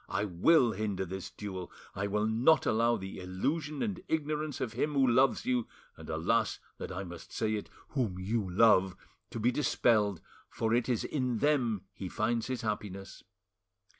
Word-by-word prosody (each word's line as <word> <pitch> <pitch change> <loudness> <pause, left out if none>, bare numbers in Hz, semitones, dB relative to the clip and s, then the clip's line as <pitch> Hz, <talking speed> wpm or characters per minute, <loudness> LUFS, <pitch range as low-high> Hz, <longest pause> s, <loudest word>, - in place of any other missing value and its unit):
I 100 - 0
will 115 - +4
hinder 100 -2 -2
this 95 +1 -6
duel; 95 -4 -7 0.2
I 100 +1 -2
will 105 +1 0
not 120 +9 +4
allow 115 +2 +3
the 95 0 -7
illusion 140 - -2
and 200 -6 -3
ignorance 155 -1 -1
of 125 -4 -3
him 150 - -1
who 135 -1 +5
loves 130 +2 +3
you 125 -2 +1 0.3
and, - - -11
alas 95 +8 +1 0.2
that - - -5
I 90 +2 -4
must 85 -2 -10
say 110 -1 -1
it, 105 - -4 0.2
whom 115 -10 -1
you 100 +1 -1
love, 95 -1 +4 0.3
to - - -5
be 120 +3 +3
dispelled, 110 - +2 0.3
for 110 0 -1
it 120 +1 +1
is 120 -3 +1
in 125 -5 -1
them 120 -8 +1
he 95 - -6
finds 115 +2 0
his 130 -1 -3
happiness. 100 -3 -4
110 Hz, 170 wpm, -31 LUFS, 95-125 Hz, 0.3 s, who